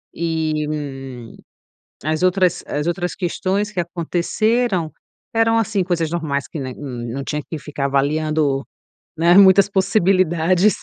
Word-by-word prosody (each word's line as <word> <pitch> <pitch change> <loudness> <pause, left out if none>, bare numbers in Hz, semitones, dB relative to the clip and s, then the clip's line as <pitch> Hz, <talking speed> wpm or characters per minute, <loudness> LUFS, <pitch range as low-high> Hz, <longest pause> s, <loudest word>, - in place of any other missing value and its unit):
Eh, 160 -2 -1
hum, 135 -5 -6 0.7
as 155 +2 -1
outras, 185 -1 +2
as 150 +1 -2
outras 175 +1 -2
questões 195 +3 -1
que 195 - -4
aconteceram 175 +3 0 0.4
eram, 225 0 +3
assim, 220 -3 +1
coisas 170 -3 -1
normais 145 -6 -2
que, 155 - -7
né, 130 -2 -5
não 125 -1 -5
tinha 150 +2 -3
que 160 - -4
ficar 145 -1 -4
avaliando, 145 0 +1 0.5
né, 170 +2 +4
muitas 195 0 +7
possibilidades. 185 -1 +2
165 Hz, 130 wpm, -20 LUFS, 150-185 Hz, 0.7 s, muitas